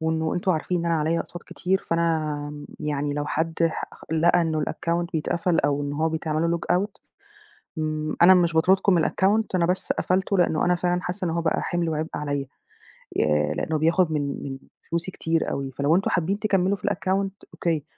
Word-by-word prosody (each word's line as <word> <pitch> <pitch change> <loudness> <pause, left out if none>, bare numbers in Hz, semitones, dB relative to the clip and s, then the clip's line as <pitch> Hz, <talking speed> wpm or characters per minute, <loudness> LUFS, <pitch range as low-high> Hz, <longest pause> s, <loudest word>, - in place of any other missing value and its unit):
وإنه 160 0 0
أنتم 180 +2 0
عارفين 175 +2 -1
إن 170 - -2
أنا 165 - +2
عليَّ 160 +2 +1
أقساط 175 - -6
كتير، 190 +2 -1
فأنا 155 -3 -1 0.2
يعني 145 -1 -1
لو 145 0 -2
حد 160 +2 -1 0.2
ح - - -3
خ - - -15
لقى 170 +2 +4
إنه 160 -2 0
الaccount 170 +2 -1
بيتقفل 170 +2 0
أو 145 0 +1
إن 145 - -3
هو 155 +2 +1
بيتعمل 160 0 -1
له 170 - +1
logout 190 +5 -1 0.8
م 155 0 -2
أنا 185 +2 +9
مش 175 -2 +3
باطردكم 185 +4 +4
من 170 -3 +3
الaccount 205 +4 +2
أنا 175 -2 +3
بس 180 +2 0
قفلته 190 +2 0
لأنه 160 -3 +2
أنا 180 0 +3
فعلًا 175 0 0
حاسة 180 +1 -3
إن 170 - 0
هو 170 +1 0
بقى 160 -1 0
حمل 175 -1 -1
وعبء 155 0 -2
عليَّ، 145 -2 -2 0.7
آآ 75 0 +2
لأنه 160 - -1
بياخد 165 +2 +2
من 145 -2 -2
من 135 -1 -5 0.3
فلوسي 170 +2 -2
كتير 165 -2 -1
أوي، 135 -1 -3
فلو 140 +5 +2
أنتم 195 - +1
حابين 190 +4 0
تكملوا 200 -2 +1
في - - -6
الaccount 195 +2 0 0.2
أوكي، 160 -4 -1
165 Hz, 195 wpm, -25 LUFS, 155-180 Hz, 0.8 s, أنا